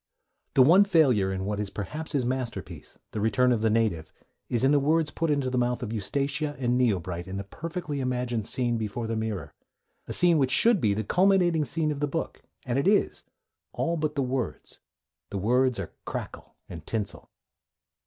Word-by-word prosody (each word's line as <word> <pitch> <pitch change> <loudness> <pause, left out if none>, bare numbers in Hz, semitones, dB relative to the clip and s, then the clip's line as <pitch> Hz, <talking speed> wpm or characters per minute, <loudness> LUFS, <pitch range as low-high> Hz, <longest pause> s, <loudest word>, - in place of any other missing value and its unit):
The 130 - +7
one 175 +9 +7
failure 135 - +3
in 95 0 -3
what 105 0 -2
is 105 -1 -3
perhaps 150 +14 -6
his 135 -4 +1
masterpiece, 125 -1 -5
The 105 - -3
Return 115 +4 +3
of 115 -3 +1
the 110 - +2
Native, 110 -8 0 0.4
is 120 -1 0
in 135 - +4
the 145 - +4
words 155 +2 +1
put 165 0 -2
into 140 -3 0
the 125 - +1
mouth 125 +1 0
of 110 -1 -4
Eustacia 140 - -1
and 125 -1 +1
Yeobright 90 -6 -1
in 95 +1 -5
the 100 - -4
perfectly 160 - -5
imagined 125 -4 -2
scene 120 -2 0
before 110 +2 -3
the 115 0 -2
mirror, 105 -9 -4 0.5
a - - -2
scene 175 -3 +5
which 135 -2 +2
should 225 - +4
be 105 -2 +2
the 110 - -2
culminating 180 - +3
scene 155 0 -1
of 145 - -4
the 145 - 0
book; 165 +3 -4 0.2
and 125 +1 0
it 140 - 0
is, 205 +1 +2 0.5
all 170 0 -1
but 155 -1 -2
the 140 - +1
words: 130 -1 -4 0.5
the 100 - -4
words 125 +5 +2
are 100 -3 -6
crackle - - -7
and 80 -2 -10
tinsel. 105 -3 -4
125 Hz, 195 wpm, -27 LUFS, 110-150 Hz, 0.5 s, The